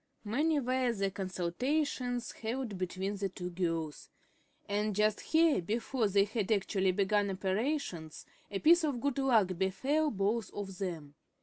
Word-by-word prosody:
Many 295 +8 +1
were 255 -1 +1
the 195 -2 -1
consultations 245 - -1
held 230 -1 -4
between 190 +2 -2
the 195 0 -1
two 180 -1 -6
girls. 165 -4 -3 0.6
And 210 0 0
just 210 0 +2
here, 320 - +3
before 225 +4 0
they 200 0 +4
had 210 0 -2
actually 195 -2 +2
begun 200 +2 +1
operations, 190 - -2 0.2
a 200 - -2
piece 335 - +5
of 285 -6 0
good 280 +1 -1
luck 235 -8 +4
befell 265 +12 +1
both 210 -1 -1
of 195 -2 -6
them. 165 -7 -4
205 Hz, 140 wpm, -32 LUFS, 190-255 Hz, 0.6 s, piece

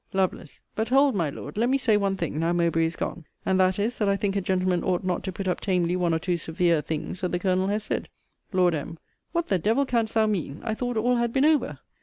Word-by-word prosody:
Lovel. 190 -2 0 0.3
But 220 +2 -1
hold, 275 +1 +4
my 170 -7 0
Lord, 170 - -8
let 235 +3 +2
me 270 - +3
say 230 -5 +2
one 195 -1 +1
thing, 160 -4 -3
now 165 +1 +1
Mowbray 170 -1 +2
is 165 - -5
gone; 170 - -4 0.2
and 190 0 +2
that 185 0 +3
is, 220 +4 -1
that 210 -2 +2
I 200 - +3
think 200 0 -1
a 200 - +1
gentleman 185 -1 0
ought 180 0 0
not 180 -2 -1
to 190 - -2
put 195 +1 -5
up 180 - 0
tamely 180 -3 +1
one 180 -2 +1
or 160 - +2
two 175 +1 -1
severe 165 0 +1
things 160 +4 -4
that 180 - -1
the 175 - +1
Colonel 185 +1 +1
has 210 +1 -1
said. - - -3 0.4
Lord 180 -3 +3
M. 160 +2 -4 0.3
What 340 -1 0
the 190 - +2
devil 225 +10 +2
canst 230 -4 -1
thou 220 -1 +4
mean? 180 -8 -2
I 220 - -1
thought 245 +1 -2
all 245 +3 +2
had 235 -1 0
been 270 +4 +2
over. 285 - +2
190 Hz, 260 wpm, -26 LUFS, 175-220 Hz, 0.4 s, hold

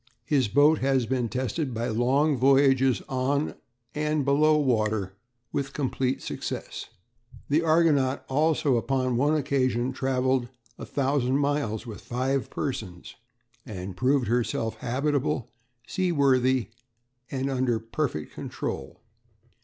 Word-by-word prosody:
His 135 -4 +2
boat 145 +7 +4
has 135 -2 +2
been 120 0 -1
tested 130 +2 -2
by 115 +2 -2
long 135 +7 +2
voyages 135 -2 +4
on 135 +3 0 0.4
and 150 -1 0
below 150 +2 +4
water 110 -8 0 0.4
with 135 -1 -3
complete 130 -2 -1
success. - - -5 0.6
The 150 +3 +3
Argonaut 155 -5 +2
also 145 -2 +2
upon 130 +1 0
one 145 +5 +2
occasion 130 -4 0
travelled 130 -1 0 0.3
a - - -7
thousand 135 -2 +1
miles 140 -6 -1
with 110 -5 -8
five 130 +2 -1
persons, 95 -10 -5 0.5
and 95 -5 -7
proved 130 +4 +2
herself 115 -1 -1
"habitable, 135 +2 -1 0.3
seaworthy, 130 - +2 0.6
and 135 0 -2
under 125 -3 +1
perfect 115 - -3
control." - - -5
130 Hz, 115 wpm, -26 LUFS, 120-145 Hz, 0.6 s, boat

